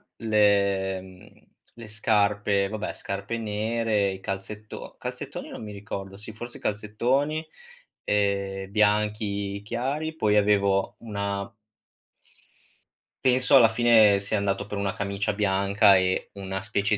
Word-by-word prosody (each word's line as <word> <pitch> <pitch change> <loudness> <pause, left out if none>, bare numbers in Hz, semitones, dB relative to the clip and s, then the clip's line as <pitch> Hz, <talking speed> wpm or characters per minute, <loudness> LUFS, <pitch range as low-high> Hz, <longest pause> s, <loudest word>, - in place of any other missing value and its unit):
le 100 -3 +2
mhmm, 100 +3 -17 0.2
le 115 -2 -11
scarpe, 105 -2 +1
vabbè 110 0 -4
scarpe 100 +4 -4
nere, 110 -1 0
i 95 0 -8
calzetto 105 +2 -7
calzettoni - - -6
non - - -8
mi 105 -1 -7
ricordo, 100 -1 -7
sì 110 +2 -9
forse 120 +3 -9
calzettoni, 125 +9 -1 0.6
ehm, 100 -1 0
bianchi 105 -1 0
chiari, 140 +8 -3
poi 105 -7 +2
avevo 100 -1 +2
una 100 -2 -4 1.7
Penso 130 +1 +4
alla 120 -4 +8
fine 110 -3 +5
sia 100 +2 -1
andato 100 0 -1
per 105 0 -5
una 100 0 -1
camicia 100 0 -2
bianca 100 0 +4
e 95 0 0
una 95 -1 -5
specie 100 +1 0
105 Hz, 120 wpm, -26 LUFS, 100-110 Hz, 1.7 s, alla